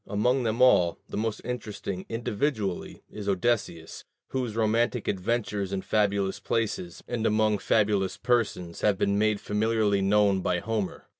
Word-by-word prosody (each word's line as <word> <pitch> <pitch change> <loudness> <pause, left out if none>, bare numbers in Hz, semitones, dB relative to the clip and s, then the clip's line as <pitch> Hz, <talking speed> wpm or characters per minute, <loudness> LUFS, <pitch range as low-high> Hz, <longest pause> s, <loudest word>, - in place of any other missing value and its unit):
Among 125 +6 +1
them 115 +1 +1
all, 90 -10 +5
the - - -7
most 110 0 -2
interesting, 105 -6 -5
individually, 115 -3 -2
is 105 -1 -5
Odysseus, 95 -5 -1 0.3
whose 125 -5 -2
romantic 115 +1 +1
adventures 100 0 -1
in 95 -1 -2
fabulous 100 -2 +1
places 105 -6 -2
and 120 -2 -2
among 110 -1 +2
fabulous 100 -3 +1
persons 105 -8 -1
have 105 -2 +3
been 100 +1 +1
made 105 -1 +2
familiarly 105 -1 +1
known 100 -1 +3
by 90 0 0
Homer. 105 +1 -3
105 Hz, 140 wpm, -27 LUFS, 100-115 Hz, 0.3 s, all